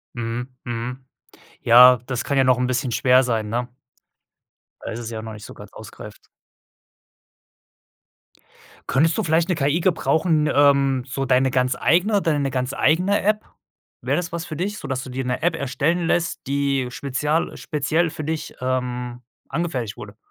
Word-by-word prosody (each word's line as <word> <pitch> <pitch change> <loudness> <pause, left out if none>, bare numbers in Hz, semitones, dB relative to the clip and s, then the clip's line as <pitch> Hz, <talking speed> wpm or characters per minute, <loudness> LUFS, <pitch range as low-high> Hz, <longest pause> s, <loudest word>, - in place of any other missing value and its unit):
Mhm, 120 +2 -4
mhm. 125 +2 -5 0.6
Ja, 125 +2 +8
das 130 -2 -3
kann 140 - 0
ja 135 - +4
noch 130 -1 +3
'n 125 - +1
bisschen 130 0 -1
schwer 130 +2 +4
sein, 115 -4 -1
ne? 120 +3 -3 1.1
Weil - - -6
das 120 - -5
ist 115 - -5
ja 110 -1 -5
noch 110 0 -7
nicht 105 -1 -10
so - - -10
ganz - - -13
ausgereift. - - -12 2.6
Könntest 160 +6 +2
du 220 - 0
vielleicht 165 +1 +1
'ne 180 - +2
KI 150 +2 +1
gebrauchen, 160 -3 +1
ähm 140 -2 +3
so 135 +1 -3
deine 130 0 +2
ganz 130 0 +1
eigene 200 +4 +2
deine 145 -4 0
ganz 125 +1 -2
eigene 180 +8 +2
App? 215 +2 +1 0.6
Wäre - - 0
das 175 -2 -2
was 170 0 -4
für 155 - -7
dich, 200 +6 -3
sodass 135 -1 -4
du 130 - -9
dir 130 +1 -4
'ne 125 0 -2
App 170 -1 +1
erstellen 150 +6 -1
lässt, 170 -4 -1
die 140 -2 0
spezial 145 +5 -2
speziell 155 +3 0
für 155 0 -7
dich, 160 +1 -4
ähm, 125 -1 -3 0.3
angefertigt 130 -11 -3
wurde? 105 0 -10
135 Hz, 165 wpm, -22 LUFS, 125-160 Hz, 2.6 s, Ja